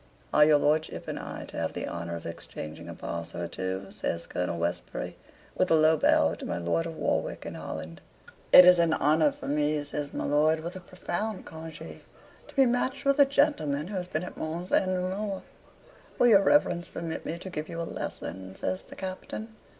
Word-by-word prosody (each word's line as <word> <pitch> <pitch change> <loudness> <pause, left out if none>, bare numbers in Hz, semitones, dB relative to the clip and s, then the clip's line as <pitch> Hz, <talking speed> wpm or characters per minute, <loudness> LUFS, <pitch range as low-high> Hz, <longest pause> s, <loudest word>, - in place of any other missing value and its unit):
"Are 150 - +7
your 150 0 +6
lordship 155 +2 0
and - - -3
I - - -6
to - - -9
have - - -1
the - - -3
honor 85 0 -4
of 85 - -8
exchanging 80 -1 -7
a - - -7
pass 85 0 -5
or 85 0 -3
two?" 95 +2 -4
says 85 0 -3
Colonel 90 -1 -2
Westbury, 85 +1 -3 0.4
with 185 - +1
a 165 - +6
low 155 0 +5
bow 80 - +4
to - - -8
my - - -2
Lord 90 - 0
of 165 - -6
Warwick - - -1
and - - -6
Holland. 80 +1 -7 0.5
"It 180 - +11
is 180 -1 +8
an 165 -1 +4
honor 155 +1 +3
for - - -9
me," 150 +1 +1
says 145 0 -4
my - - -3
lord, 155 +2 +3
with 170 +3 -6
a - - -5
profound 185 +3 -4
congee, 160 -1 -9 0.5
"to - - -15
be 270 -1 +6
matched 255 +3 0
with 275 +1 +3
a 285 - +9
gentleman 230 - +1
who 205 - -5
has 180 -1 -3
been 155 -1 -2
at 180 - -8
Mons 170 +3 -4
and 190 - +3
Namur." 190 +2 -2 0.7
"Will 245 - +5
your 200 -3 +7
Reverence 180 -7 +3
permit 165 -1 -5
me 165 - -4
to 185 +2 -8
give 155 -1 -4
you 170 -1 -5
a - - -1
lesson?" 95 - -6
says 185 - -2
the - - -13
Captain. 190 +3 -6
160 Hz, 205 wpm, -28 LUFS, 140-185 Hz, 0.7 s, It